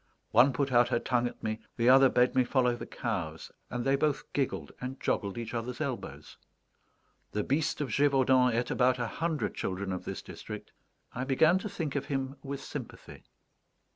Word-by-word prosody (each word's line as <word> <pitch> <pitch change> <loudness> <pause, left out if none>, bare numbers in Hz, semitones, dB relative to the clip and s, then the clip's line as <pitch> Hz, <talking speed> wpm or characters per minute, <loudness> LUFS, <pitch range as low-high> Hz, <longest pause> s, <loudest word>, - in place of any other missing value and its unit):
One 125 +5 +6
put 135 +1 -1
out 120 -1 +5
her - - +2
tongue 120 0 +1
at - - -10
me, 110 0 -2 0.2
the 120 0 +2
other 135 +1 +8
bade 125 0 +3
me 130 - +4
follow 125 -1 +2
the - - -8
cows, 85 -9 -4 0.2
and 125 -1 -3
they 135 0 +4
both 145 0 0
giggled 125 - -1
and 130 +1 -5
joggled 100 -1 -1
each 115 0 -5
other's 120 +1 -4
elbows. 140 -5 -5 1.0
The 105 - 0
Beast 150 +3 0
of 140 - -2
Gévaudan 130 -1 +4
ate 120 +1 -1
about 125 0 +3
a 120 - -1
hundred 160 +6 -2
children 95 +1 -3
of 90 - -4
this - - -5
district; - - -8 0.4
I 125 - -3
began 155 +7 +4
to 210 - -5
think 165 -8 -4
of 140 - -1
him 135 0 -2
with 140 0 -6
sympathy. - - -8
125 Hz, 185 wpm, -30 LUFS, 120-140 Hz, 1.0 s, other